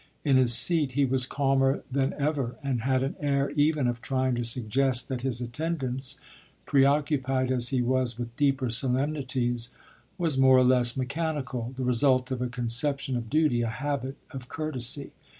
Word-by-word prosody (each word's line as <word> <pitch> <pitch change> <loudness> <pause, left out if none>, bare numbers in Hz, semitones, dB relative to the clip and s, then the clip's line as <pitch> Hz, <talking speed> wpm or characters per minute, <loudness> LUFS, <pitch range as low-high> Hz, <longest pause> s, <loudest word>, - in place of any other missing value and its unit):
In 140 -2 +3
his 125 -2 +4
seat 155 -5 +4
he 140 +1 +2
was 130 -1 +1
calmer 135 0 +1
than 135 0 0
ever 140 -4 -2
and 130 -4 -1
had 130 +1 0
an 135 - -2
air 140 -1 0
even 150 -1 +1
of 120 -1 -3
trying 130 -1 -1
to 120 0 -2
suggest 125 +2 0
that 130 -2 -3
his 125 -2 -1
attendance, 135 0 -3 0.5
preoccupied 135 -2 +1
as 120 -2 +2
he 130 -2 0
was 125 -1 0
with 120 -1 -6
deeper 135 -3 0
solemnities, 125 -1 0 0.5
was 165 -7 0
more 130 -1 +6
or 130 - +5
less 125 -1 +3
mechanical, 135 -3 -3
the 130 - -3
result 125 +1 +2
of 130 -1 -3
a 125 - -1
conception 125 +3 -1
of 115 -2 -4
duty, 150 -5 +2
a 115 - -1
habit 135 +3 -4
of 130 -1 -8
courtesy. 140 -3 -3
130 Hz, 170 wpm, -27 LUFS, 125-140 Hz, 0.5 s, more